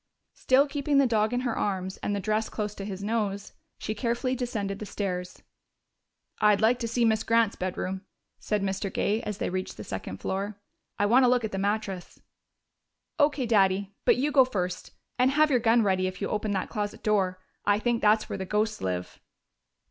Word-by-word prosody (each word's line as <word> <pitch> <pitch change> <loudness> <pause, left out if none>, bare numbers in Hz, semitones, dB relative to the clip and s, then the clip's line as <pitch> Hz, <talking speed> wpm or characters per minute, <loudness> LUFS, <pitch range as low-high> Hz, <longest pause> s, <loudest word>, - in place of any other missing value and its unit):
Still 265 +2 +3
keeping 285 0 0
the 275 - +6
dog 220 -2 +2
in 245 0 0
her 245 -3 -1
arms 190 -2 -2
and 205 - -2
the - - -1
dress 215 +2 -1
close 210 -1 -3
to 195 - -7
his 195 -1 -6
nose, 205 -2 -2 0.2
she 215 - -3
carefully 240 +3 -1
descended 220 -6 -3
the 215 - -5
stairs. 180 -3 -4 1.0
"I'd 210 -1 +4
like 230 +3 +3
to 230 - -2
see 235 +1 +1
Miss 220 -1 +2
Grant's 230 -2 +2
bedroom," 185 +1 -3 0.4
said 210 -2 -1
Mr. 195 0 -2
Gay 215 +5 0
as 210 -4 -4
they - - -2
reached 185 0 -4
the 105 - -7
second 95 -1 -6
floor. 195 - -3 0.4
"I 205 - +2
want 250 +5 +5
a - - +5
look 245 -1 +3
at 220 - -3
the 195 - -3
mattress." 200 -2 -2 1.0
"O.K., 290 -3 +3
Daddy. 200 -3 +2
But - - +5
you 285 +4 +1
go 275 -2 +7
first. 185 -7 -3 0.3
And 255 +1 +5
have 300 +2 +3
your 250 - +4
gun 230 0 +4
ready 185 -2 +1
if 185 - -6
you 200 - -2
open 210 0 -1
that 190 - -2
closet 205 -2 -4
door. 190 -4 +1 0.3
I 205 0 +5
think 235 +1 0
that's 215 +1 +3
where - - -5
the - - -2
ghosts 215 +3 -1
live." 90 -1 -4
210 Hz, 200 wpm, -27 LUFS, 195-235 Hz, 1.0 s, go